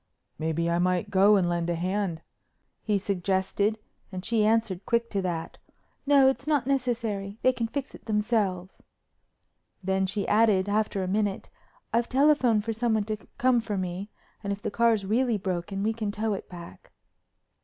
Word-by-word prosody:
"Maybe 160 +1 -1
I 170 0 +1
might 180 0 0
go 200 +2 +6
and 185 -3 +2
lend 175 0 -1
a 170 - 0
hand," 180 -1 -2 0.6
he 210 -2 +1
suggested 195 +2 0 0.3
and 185 0 -6
she 225 -2 +2
answered 215 -4 +1
quick 235 0 +1
to 200 - 0
that: 170 -3 -4 0.5
"No, 280 -2 +6
it's 270 +1 0
not 295 -5 +2
necessary. 230 -7 -1
They 255 - +5
can 235 -2 -2
fix 275 +3 -5
it - - -13
themselves," 210 -4 -1 1.0
then 190 0 +1
she 200 +1 -2
added, 210 -3 +3
after 205 -1 0
a - - -3
minute, 200 0 -1 0.4
"I've 235 +1 +1
telephoned 260 -6 +3
for 225 - -1
someone 220 -1 +1
to 215 +1 -3 0.2
come 250 -1 +3
for 210 -3 -3
me 185 +2 -4 0.3
and 200 - -2
if 200 0 -5
the - - -2
car's 230 -2 +2
really 230 +2 +1
broken 195 +1 -3
we 220 +1 +1
can 220 -2 -3
tow 215 +1 -1
it 195 - -6
back." 170 -1 -11
205 Hz, 170 wpm, -27 LUFS, 190-230 Hz, 1.0 s, go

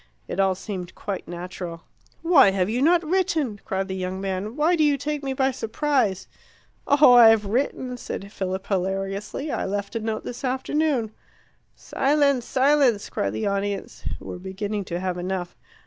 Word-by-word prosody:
It - - -4
all 190 -1 +3
seemed 185 -2 -6
quite 200 -2 -5
natural. 175 -1 -7 0.4
"Why 325 - +6
have 195 +1 0
you 245 +3 0
not 335 +3 +4
written?" 315 - 0
cried 190 0 -2
the 190 - -4
young 185 0 -3
man. 195 +3 -3
"Why 310 +4 +3
do 315 - +2
you 290 -2 +3
take 295 +1 -3
me 270 -1 -2
by 265 0 +1
surprise?" 235 - 0 0.6
"Oh, 285 -3 +7
I've 225 -3 +7
written," 250 +3 -1
said 200 -4 -6
Philip 190 0 -3
hilariously. 195 +8 -2
"I - - -2
left 200 +3 -3
a - - 0
note 220 0 -3
this 245 +3 -7
afternoon." 265 -2 0 0.6
"Silence! 280 -3 +1
silence!" 265 -5 +2
cried 100 0 -1
the 110 - -2
audience, 200 0 -3
who - - -14
were - - -6
beginning 200 +2 -4
to 175 0 -3
have 180 -1 -2
enough. 180 -1 -4
210 Hz, 165 wpm, -24 LUFS, 190-275 Hz, 0.6 s, Oh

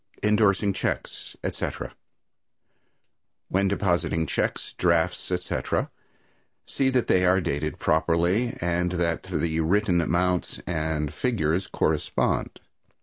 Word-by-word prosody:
Indorsing 105 -1 +3
Checks, - - -4
Etc. - - -3 1.6
When 100 +1 +2
depositing 90 -4 +1
checks, - - -2
drafts, 85 -2 +1
etc., 90 0 -1 0.7
see 135 -1 +1
that 130 -2 +1
they 90 - +3
are 90 +1 +4
dated 75 -3 -2
properly 85 +9 +1
and 90 +1 0
that 85 -2 0
the 80 -1 -1
written 90 +2 +2
amounts 90 +2 0
and 80 -3 -2
figures 95 -7 0
correspond. - - 0
90 Hz, 100 wpm, -26 LUFS, 80-100 Hz, 1.6 s, are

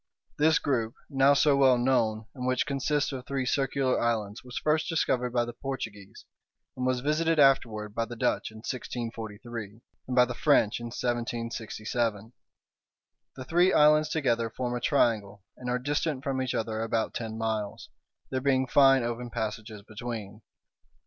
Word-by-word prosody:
This 155 +1 +5
group, 115 -5 -1 0.2
now 135 +1 +5
so 140 0 +4
well 135 -2 +5
known, 115 -3 +1
and 125 -1 -4
which 130 0 +1
consists 145 +1 0
of 130 -2 -5
three 135 -2 -2
circular 135 0 +1
islands, 110 -3 -1
was 125 -1 -8
first 155 +1 +1
discovered 130 -6 +1
by 120 0 +1
the 120 - -7
Portuguese, 110 -7 -7 0.5
and 130 0 -2
was 130 -1 0
visited 160 +3 +1
afterward 115 -7 +3
by 115 +1 -1
the 120 - -8
Dutch - - 0
in 110 - -13
1643, 115 -3 -6 0.3
and 130 - -2
by 125 -1 +6
the 125 - -5
French 140 -8 +3
in 120 - -6
1767. 115 -2 -3 1.0
The 130 - -8
three 175 +5 +3
islands 150 +1 +5
together 120 -7 0
form 125 +1 -3
a 120 - -3
triangle, 110 -7 +1
and 125 -1 -6
are 125 - +1
distant 145 +1 -2
from 135 -2 -1
each 130 -1 -2
other 110 0 -2
about 115 0 -1
ten 110 -1 -5
miles, 110 -2 -3 0.4
there 130 -1 -1
being 130 -1 +2
fine 135 -1 +5
open 120 +1 -3
passages 110 -2 -5
between. 110 -1 -7
125 Hz, 160 wpm, -28 LUFS, 115-135 Hz, 1.0 s, by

